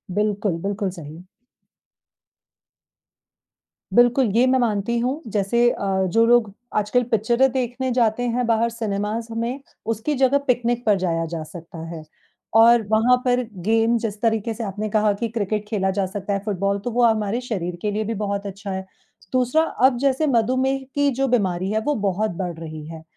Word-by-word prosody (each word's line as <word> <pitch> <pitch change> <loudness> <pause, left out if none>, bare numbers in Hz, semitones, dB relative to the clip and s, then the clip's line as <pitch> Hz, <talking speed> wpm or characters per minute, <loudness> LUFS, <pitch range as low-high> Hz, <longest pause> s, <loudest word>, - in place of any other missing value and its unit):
बिल्कुल, 205 -3 0
बिल्कुल 200 +1 -2
सही। 160 +4 -11 2.7
बिल्कुल, 245 +2 +5
ये 240 +2 +5
मैं 260 0 +3
मानती 230 -1 0
हूँ, 260 +6 -1
जैसे 220 +4 +2
अ, 195 -4 -1
जो 225 +5 +3
लोग 235 -3 +4 0.2
आजकल 215 +4 +2
पिक्चरें 235 +4 +3
देखने 255 0 -2
जाते 235 -1 +1
हैं 245 +1 0
बाहर 230 0 +2
सिनेमाज़ 225 0 -3
में, 235 +4 -2 0.3
उसकी 230 +7 -1
जगह 265 +1 +3
पिकनिक 240 -1 +1
पर 210 -3 +4
जाया 165 -2 0
जा 160 -2 -3
सकता 165 +2 -11
है 165 -2 -7 0.6
और 235 +1 +6
वहाँ 220 +4 +4
पर 250 0 +2 0.2
गेम 225 +1 +3
जिस 210 -1 -5
तरीके 225 -1 0
से 230 - -5
आपने 210 +1 -4
कहा 210 0 +2
कि 230 +4 -3
क्रिकेट 210 -1 -2
खेला 190 -3 0
जा 195 0 0
सकता 200 +1 -4
है, 195 - 0
फुटबॉल, 200 -1 -1
तो 240 +5 -4
वो 245 +1 +2
हमारे 220 +1 +1
शरीर 190 -8 -3
के 210 - -1
लिए 215 +1 -1
भी 225 +2 -3
बहुत 200 0 -3
अच्छा 200 +1 -7
है। 190 0 -4 0.5
दूसरा, 255 +4 +3
अब 260 -5 +2
जैसे 275 +4 +1
मधुमेह 260 +2 +2 0.2
की 285 0 +3
जो 270 +2 0
बीमारी 190 -6 0
है, 215 - +1
वो 295 +7 -1
बहुत 210 +3 0
बढ़ 175 -1 -3
रही 155 -2 -7
है 160 0 -9
220 Hz, 175 wpm, -22 LUFS, 200-245 Hz, 2.7 s, और